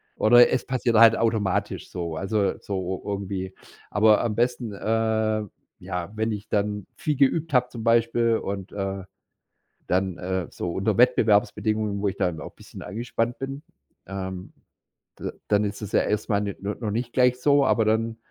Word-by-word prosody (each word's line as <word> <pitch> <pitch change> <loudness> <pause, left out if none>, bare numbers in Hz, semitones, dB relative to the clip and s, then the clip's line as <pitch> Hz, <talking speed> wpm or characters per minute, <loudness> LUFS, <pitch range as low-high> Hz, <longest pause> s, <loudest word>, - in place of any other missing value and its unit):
Oder 120 +2 +6
es - - 0
passiert 125 -3 0
halt 115 0 +8
automatisch 110 -5 -1
so 85 -2 -4
also 100 +4 0
so 95 -2 -4
irgendwie. 95 -2 -4 0.4
Aber 105 0 +4
am 115 -3 -1
besten, 120 -1 0
äh 110 0 0 0.4
ja, 90 0 -5
wenn 110 +1 -1
ich 105 0 -5
dann 105 0 -1
viel 155 -6 -2
geübt 150 +4 +2
habe 125 -1 +4
zum 115 -3 -8
Beispiel 115 0 +3
und, 100 -2 -5
äh 95 -1 -4 0.8
dann, 95 -1 0
äh, 95 -1 -3
so 90 - -4
unter 100 +2 0
Wettbewerbsbedingungen, 110 -3 +2
wo 105 - +1
ich 100 - -3
dann 80 -4 -1
auch - - -8
'n - - -42
bisschen - - -12
angespannt 115 +4 -3
bin, 135 +1 -5 0.5
ähm, 95 -1 -6 0.7
d - - -4 0.2
dann 105 0 +3
ist 100 +1 -5
es 105 -1 -6
ja - - +4
erst 105 0 -2
mal 100 -2 +2
ne 100 -1 -3
no 100 +1 -2
noch 110 -4 -3
nicht 120 +3 -2
gleich 125 -1 +3
so, 140 0 +4
aber 115 - +3
dann 110 +1 0
110 Hz, 175 wpm, -25 LUFS, 100-115 Hz, 0.8 s, halt